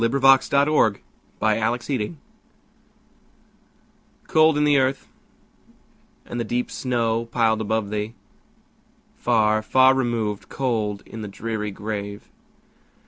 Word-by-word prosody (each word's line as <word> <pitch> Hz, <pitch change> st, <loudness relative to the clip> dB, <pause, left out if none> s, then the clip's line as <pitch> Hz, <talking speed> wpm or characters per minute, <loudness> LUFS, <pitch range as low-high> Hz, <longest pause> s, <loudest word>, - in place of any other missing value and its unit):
Emily 125 Hz, +4 st, +1 dB
Brontë 135 Hz, -3 st, +4 dB, 0.5 s
Remembrance 115 Hz, +5 st, 0 dB, 2.1 s
COLD 155 Hz, -1 st, +4 dB
in 150 Hz, -, +2 dB
the 145 Hz, -2 st, +4 dB
earth, 135 Hz, +1 st, -1 dB, 1.2 s
and 120 Hz, -, -5 dB
the -, -, 0 dB
deep 120 Hz, +2 st, -2 dB
snow 115 Hz, -2 st, -1 dB
piled 115 Hz, -2 st, +1 dB
above 110 Hz, -1 st, -2 dB
thee! 105 Hz, +2 st, -3 dB, 1.0 s
Far, 110 Hz, -2 st, +2 dB
far 130 Hz, +4 st, +5 dB
removed, 115 Hz, -6 st, -2 dB
cold 110 Hz, -6 st, -2 dB
in 110 Hz, -, -9 dB
the 105 Hz, -, -5 dB
dreary 105 Hz, +1 st, -4 dB
grave! 100 Hz, 0 st, -6 dB
115 Hz, 100 wpm, -23 LUFS, 105-130 Hz, 2.1 s, far